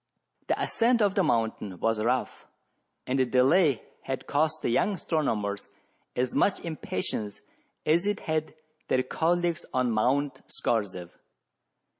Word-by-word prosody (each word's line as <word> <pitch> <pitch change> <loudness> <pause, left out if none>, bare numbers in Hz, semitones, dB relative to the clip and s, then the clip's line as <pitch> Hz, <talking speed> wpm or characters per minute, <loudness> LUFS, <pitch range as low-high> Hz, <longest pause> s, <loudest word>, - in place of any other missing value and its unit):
The - - 0
ascent 235 +1 +2
of 200 -2 +3
the 200 - +2
mountain 110 - 0
was 115 -1 +1
rough, 125 +2 -1 0.6
and 130 +1 0
the 130 - +4
delay 135 +2 +4 0.2
had 135 0 -4
caused 155 +2 0
the - - +1
young 200 - +2
astronomers 110 - -1 0.5
as 125 0 0
much 200 - +2
impa 155 - -3
tience 105 -2 -3 0.4
as 170 +5 +3
it 205 +1 0
had 155 0 -2 0.3
their 130 - +2
colleagues 170 +2 0
on 125 -2 +2
Mount 135 +6 +1
Scorzef. 95 -6 -2
135 Hz, 135 wpm, -28 LUFS, 115-165 Hz, 0.6 s, the